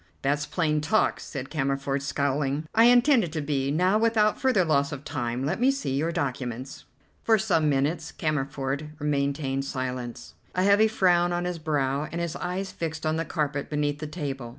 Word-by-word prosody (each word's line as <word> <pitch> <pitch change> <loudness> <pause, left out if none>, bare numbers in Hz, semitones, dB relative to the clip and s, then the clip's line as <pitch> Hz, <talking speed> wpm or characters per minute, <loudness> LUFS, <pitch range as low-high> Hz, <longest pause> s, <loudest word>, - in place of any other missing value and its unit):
"That's 145 +2 0
plain 155 -4 0
talk," 160 +9 +2
said 135 -1 -7
Cammerford, 135 -1 -1
scowling. 140 +1 -1
"I 225 +1 +6
intend 245 +1 +5
it 170 - -4
to 160 - -2
be. 140 -2 -1
Now, 180 +8 +2
without 220 -2 +2
further 250 -9 +3
loss 140 -3 +2
of 145 -1 -6
time, 125 -4 -3
let 150 - -1
me 255 +2 +4
see 275 - -1
your 160 +4 0
documents." 130 -3 -4 0.4
For 225 -1 +4
some 180 -8 +2
minutes 150 +4 0
Cammerford 145 0 -3
maintained 140 -2 -1
silence, 125 -3 -5 0.2
a 185 - +2
heavy 200 +2 +5
frown 175 -5 +3
on 175 0 -1
his 180 -1 -3
brow, 145 -2 0
and 170 - -3
his 170 -1 -3
eyes 185 +2 -3
fixed 160 -1 -4
on 155 0 +1
the 165 - -1
carpet 145 -2 -2
beneath 145 -1 -1
the 155 - -4
table. 140 -6 -5
150 Hz, 180 wpm, -26 LUFS, 140-175 Hz, 0.4 s, I